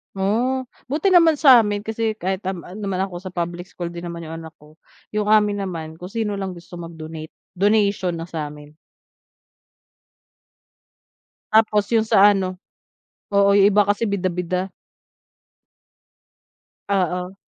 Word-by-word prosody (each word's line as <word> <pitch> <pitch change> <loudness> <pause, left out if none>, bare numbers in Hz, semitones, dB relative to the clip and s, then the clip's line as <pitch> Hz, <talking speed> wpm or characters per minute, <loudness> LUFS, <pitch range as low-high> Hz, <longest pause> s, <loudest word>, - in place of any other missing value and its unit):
Oo, 240 +7 0 0.2
buti 310 +6 +1
naman 330 -5 +5
sa 255 -6 +8
amin 205 0 -1
kasi 225 0 -1
kahit 190 +2 -2
nam, 185 -2 -5
ah, 180 - -10
naman 195 -3 -3
ako 185 - -10
sa 185 - -7
public 175 0 -4
school 175 -2 -7
din 170 0 -8
naman 170 -1 -6
yung 165 0 -7
anak 160 - -10
ko, 150 +1 -19 0.4
yung 210 0 +1
amin 205 -2 +3
naman, 160 -4 -6
kung 180 +3 -10
sino 215 -2 -2
lang 195 -1 -4
gusto 175 0 -11
mag-donate, 160 -2 -8 0.2
donation 200 -3 +1
na 165 - -6
sa'min. 150 -2 -7 2.8
Tapos 215 -1 +4
yung 225 -1 +2
sa 205 0 +6
ano 185 -2 -1 0.8
oo, 200 0 +4
yung 200 +1 +6
iba 205 0 +3
kasi 205 +3 +1
bida-bida. 185 -2 -1 2.2
Oo. 180 -1 -1
190 Hz, 135 wpm, -21 LUFS, 175-210 Hz, 2.8 s, sa